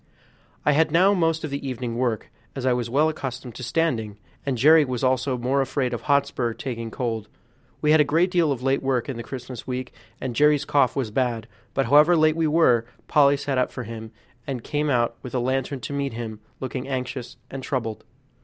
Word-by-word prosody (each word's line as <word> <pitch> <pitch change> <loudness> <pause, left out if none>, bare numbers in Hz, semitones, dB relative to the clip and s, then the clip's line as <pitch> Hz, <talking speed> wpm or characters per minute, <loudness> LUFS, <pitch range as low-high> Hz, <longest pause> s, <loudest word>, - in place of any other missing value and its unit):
I 150 - +5
had 160 +2 +3
now 185 +5 +5
most 165 -4 +1
of 155 - -4
the 140 0 -4
evening 120 -2 -4
work, 120 -3 -1 0.2
as 135 -2 -4
I 130 - +4
was 120 -1 -2
well 145 +6 +3
accustomed 130 -5 -5
to - - -9
standing, 120 -7 -1 0.3
and 135 -3 0
Jerry 155 +5 +7
was 130 -3 -3
also 130 0 +1
more 130 +3 +1
afraid 130 -1 -1
of 120 - -3
Hotspur 140 -5 +1
taking 115 -3 -5
cold. 115 -2 -3 0.6
We 150 - +4
had 155 0 +6
a - - +6
great 165 +6 +2
deal 170 -5 +3
of 125 -2 -3
late 135 +1 +2
work 130 -1 0
in 130 - -4
the - - -4
Christmas 125 0 -8
week, 130 0 -4 0.3
and 125 -2 -4
Jerry's 150 +1 +4
cough 140 -3 +2
was 130 -6 -2
bad; 115 -2 -1 0.3
but 135 - +2
however 150 +7 +6
late 155 -1 +4
we 165 -1 +1
were, 125 -8 +3 0.2
Polly 140 -1 +5
sat 140 -2 -1
up 125 - +1
for 125 - -5
him, 110 -1 -7 0.4
and 130 -4 -4
came 150 0 -1
out 120 -3 +1
with 125 - -7
a - - +2
lantern 130 +2 -1
to 140 - -5
meet 140 -3 -2
him, 115 -2 -6 0.2
looking 130 0 -4
anxious 130 -2 -4
and 135 - -5
troubled. 115 -5 -3
130 Hz, 210 wpm, -24 LUFS, 120-145 Hz, 0.6 s, Jerry